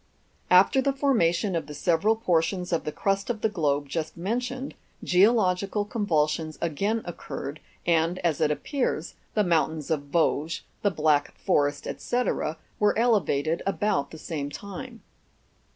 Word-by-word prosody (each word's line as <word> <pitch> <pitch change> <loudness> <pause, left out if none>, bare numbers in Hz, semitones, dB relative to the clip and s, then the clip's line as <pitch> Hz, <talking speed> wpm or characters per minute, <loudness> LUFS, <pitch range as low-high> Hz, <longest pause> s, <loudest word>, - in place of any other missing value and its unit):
After 190 +9 +6
the 275 +1 +1
formation 210 - +2
of 165 - -2
the 150 - -8
several 180 +8 +2
portions 180 -3 0
of 165 - 0
the 150 - -2
crust 195 +5 -1
of 225 -3 -2
the 220 - +2
globe 145 -7 0
just 160 +3 -4
mentioned, 250 +8 -3 0.3
geological 200 0 +3
convulsions 160 -7 0
again 200 +8 -1
occurred, 155 -4 -6 0.3
and, 165 +1 +2
as 160 -4 +1
it - - +4
appears, 260 - -2 0.2
the 210 - +4
mountains 160 -3 0
of 145 -3 0
Vosges, 160 +1 +1 0.2
the 205 - +3
Black 150 -4 +1
Forest, 145 0 +1
&c., 245 +1 0 0.6
were 210 0 +3
elevated 170 -9 +2
about 195 -8 0
the 160 - -10
same 150 -2 -4
time. 230 - -8
175 Hz, 140 wpm, -26 LUFS, 155-215 Hz, 0.6 s, After